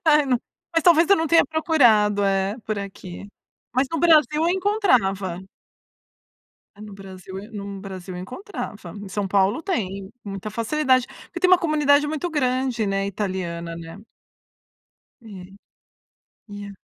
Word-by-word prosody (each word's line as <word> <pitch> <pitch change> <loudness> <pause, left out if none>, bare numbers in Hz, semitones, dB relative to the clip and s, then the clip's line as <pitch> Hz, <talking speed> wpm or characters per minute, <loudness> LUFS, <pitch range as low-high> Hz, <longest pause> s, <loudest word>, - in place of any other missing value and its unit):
ai 300 -2 +5
não 250 -3 +1 0.3
mas 330 - +3
talvez 340 0 +5
eu 400 - +7
não 325 - 0
tenha 330 -2 +5
procurado, 235 -10 +3
eh, 195 +1 +1
por 215 - -2
aqui, 195 -1 -8 0.4
mas 260 +3 +2
no 330 - -2
Brasil 320 -3 +6 0.2
eu 330 - +3
encontrava. 255 - +1 1.4
É, - - -13
no 210 -1 -9
Brasil, 190 -1 -9
eh 205 - -10
num 200 -1 -6
Brasil 190 -2 -8
eu 180 - -6
encontrava. 210 - -7
Em 205 - -8
São 200 +1 -2
Paulo 195 +7 +2
tem 200 - -3
muita 195 +1 -5
facilidade 255 +2 +1 0.2
porque - - -8
tem 365 - +3
uma 370 - +7
comunidade 300 -4 +3
muito 310 +4 -3
grande, 255 -5 0
né, 195 0 -1
italiana, 180 -4 -4
né. 165 +1 -9 1.2
É. 230 - -15 1.2
E 205 0 -7
a 200 - -10
215 Hz, 150 wpm, -23 LUFS, 195-305 Hz, 1.4 s, eu